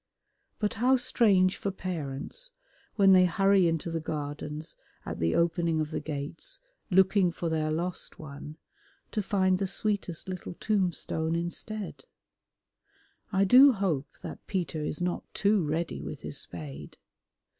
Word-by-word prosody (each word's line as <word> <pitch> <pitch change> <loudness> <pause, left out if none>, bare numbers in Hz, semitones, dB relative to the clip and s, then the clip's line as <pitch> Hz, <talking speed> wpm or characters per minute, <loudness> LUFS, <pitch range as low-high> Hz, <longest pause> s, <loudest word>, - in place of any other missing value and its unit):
But 210 -1 0
how 260 +2 +5
strange 200 -7 +3
for 200 - -2
parents, 185 - -4 0.4
when 195 -2 +6
they 185 -1 +7
hurry 195 0 +4
into 165 0 -1
the 165 - -1
Gardens 150 0 -5 0.3
at - - -5
the 80 0 +1
opening 170 -1 +2
of 155 0 -2
the - - -2
gates 150 - -5 0.3
looking 190 -1 +4
for 170 0 -3
their 155 -1 0
lost 175 +3 -3
one, 150 0 -9 0.5
to 215 - 0
find 190 -2 +2
the 195 - 0
sweetest 195 -4 -1
little 185 -1 -6
tombstone 170 -5 0
instead. 190 - -5 1.3
I 195 -1 +3
do 255 +7 +8
hope 180 - -1 0.2
that - - -8
Peter 165 -6 -2
is 150 - -2
not 175 0 -1
too 205 -2 +3
ready 160 +2 -2
with - - -7
his - - -2
spade. 75 -5 -7
175 Hz, 140 wpm, -29 LUFS, 155-195 Hz, 1.3 s, do